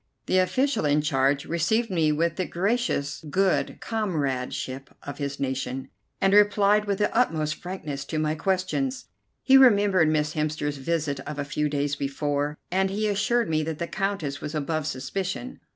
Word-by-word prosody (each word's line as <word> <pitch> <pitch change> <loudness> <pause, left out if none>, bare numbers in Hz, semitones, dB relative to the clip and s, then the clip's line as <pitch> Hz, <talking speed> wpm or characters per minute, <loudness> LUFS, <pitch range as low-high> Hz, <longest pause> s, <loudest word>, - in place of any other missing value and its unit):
The 185 - +3
official 255 +6 +1
in 150 0 +2
charge 135 -1 +1
received 220 +7 0
me 160 -4 +2
with 165 +2 0
the 185 - -1
gracious 185 - -1
good 190 +3 +1
comradeship 140 - -2
of 145 - -7
his 140 0 -3
nation, 130 -1 -3 0.3
and 195 0 +3
replied 205 0 +4
with 200 -1 0
the 210 - 0
utmost 160 -11 +2
frankness 155 -7 -6
to 155 - -4
my 155 0 +1
questions. 190 - -1 0.4
He 270 0 +7
remembered 205 -9 +5
Miss 155 -1 +1
Hemster's 150 -1 -2
visit 145 0 -1
of 150 +2 -7
a 145 - -2
few 150 +1 -1
days 145 0 -1
before, 145 +1 -2
and 190 +1 +2
he 210 +2 -1
assured 210 +3 +1
me 155 -1 +1
that 155 0 -3
the 170 - -2
Countess 195 -7 -3
was 150 +1 -5
above 155 +1 -1
suspicion. 185 - -4
160 Hz, 165 wpm, -26 LUFS, 145-200 Hz, 0.4 s, He